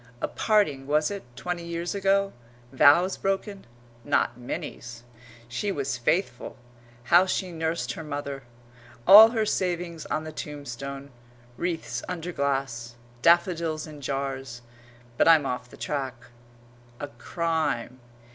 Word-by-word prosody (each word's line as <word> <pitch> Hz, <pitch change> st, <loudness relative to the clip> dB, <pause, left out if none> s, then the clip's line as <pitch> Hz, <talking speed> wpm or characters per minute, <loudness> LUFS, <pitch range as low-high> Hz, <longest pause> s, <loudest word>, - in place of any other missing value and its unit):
A -, -, -1 dB
parting, 155 Hz, -12 st, +1 dB
was 150 Hz, +3 st, +2 dB
it, 200 Hz, -1 st, -4 dB
twenty 175 Hz, +4 st, -4 dB
years 170 Hz, 0 st, -3 dB
ago? 195 Hz, 0 st, +1 dB, 0.4 s
Vows 170 Hz, +8 st, +5 dB
broken? 195 Hz, -, -3 dB, 0.4 s
Not -, -, +1 dB
Minnie's!... 120 Hz, -1 st, -7 dB, 0.4 s
She 125 Hz, +12 st, -2 dB
was 140 Hz, -6 st, -2 dB
faithful. 135 Hz, -2 st, -1 dB, 0.5 s
How 175 Hz, +9 st, +5 dB
she 185 Hz, 0 st, -1 dB
nursed 165 Hz, 0 st, -2 dB
her 160 Hz, -, -6 dB
mother! 145 Hz, -2 st, -5 dB, 0.6 s
All 215 Hz, +3 st, +11 dB
her 225 Hz, -2 st, 0 dB
savings 175 Hz, -4 st, -2 dB
on 155 Hz, -, -2 dB
the 155 Hz, -, -7 dB
tombstone 140 Hz, -2 st, -7 dB, 0.4 s
wreaths 125 Hz, -9 st, -3 dB
under 180 Hz, -1 st, -4 dB
glass 135 Hz, -6 st, -2 dB, 0.3 s
daffodils 170 Hz, -2 st, +3 dB
in 150 Hz, -2 st, -11 dB
jars. 135 Hz, -3 st, -4 dB, 0.5 s
But -, -, +4 dB
I'm 160 Hz, -3 st, +6 dB
off 125 Hz, -1 st, -4 dB
the -, -, -14 dB
track. 135 Hz, -3 st, -3 dB, 0.8 s
A 145 Hz, -, -4 dB
crime.... 160 Hz, -6 st, -2 dB
155 Hz, 125 wpm, -26 LUFS, 135-175 Hz, 0.8 s, All